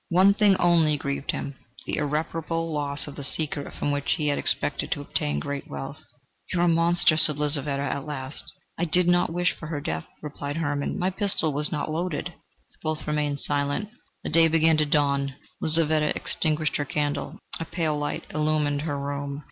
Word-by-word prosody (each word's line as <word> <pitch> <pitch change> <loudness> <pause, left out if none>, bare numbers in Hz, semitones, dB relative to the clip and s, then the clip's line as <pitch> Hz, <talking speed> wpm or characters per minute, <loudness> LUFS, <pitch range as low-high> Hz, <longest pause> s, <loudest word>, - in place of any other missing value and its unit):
One 185 +3 +5
thing 205 -1 +4
only 165 -4 +4
grieved 140 -1 -4
him: 140 - -3 0.3
the - - -2
irreparable 160 +2 -2
loss 145 -1 -1
of 145 - -9
the 140 - -7
secret 145 0 +5
from 145 - -1
which 145 -1 0
he 150 -2 -1
had 145 - 0
expected - - 0
to - - -1
obtain 75 0 -1
great 140 - -5
wealth. 140 +3 -7 0.5
"You 180 - 0
are - - +3
a - - +4
monster!" 170 0 +4
said 150 -2 +5
Lizaveta 145 -1 0
at 140 +1 -3
last. 135 -1 -6 0.3
"I 175 - +1
did 175 +2 +2
not 175 -1 +3
wish 175 +1 +1
for 165 - -9
her 155 -2 -3
death," 80 - -4 0.2
replied 145 0 -5
Hermann: 145 -1 -2
"my 185 0 0
pistol 190 -6 0
was 150 +1 -1
not 155 0 -2
loaded." 175 +1 -3 0.5
Both 155 -1 -3
remained 150 -2 -1
silent. 145 +8 -1 0.3
The - - -4
day 165 +1 +6
began 160 0 +3
to 155 -1 +2
dawn. 140 -2 +1 0.3
Lizaveta 155 -1 +3
extinguished 155 -1 +1
her 145 - -2
candle: 145 +1 -2 0.2
a 165 - -3
pale 160 -2 -1
light 145 0 -3
illumined 150 -2 0
her 145 -2 -3
room. 140 0 -4
150 Hz, 185 wpm, -25 LUFS, 145-165 Hz, 0.5 s, day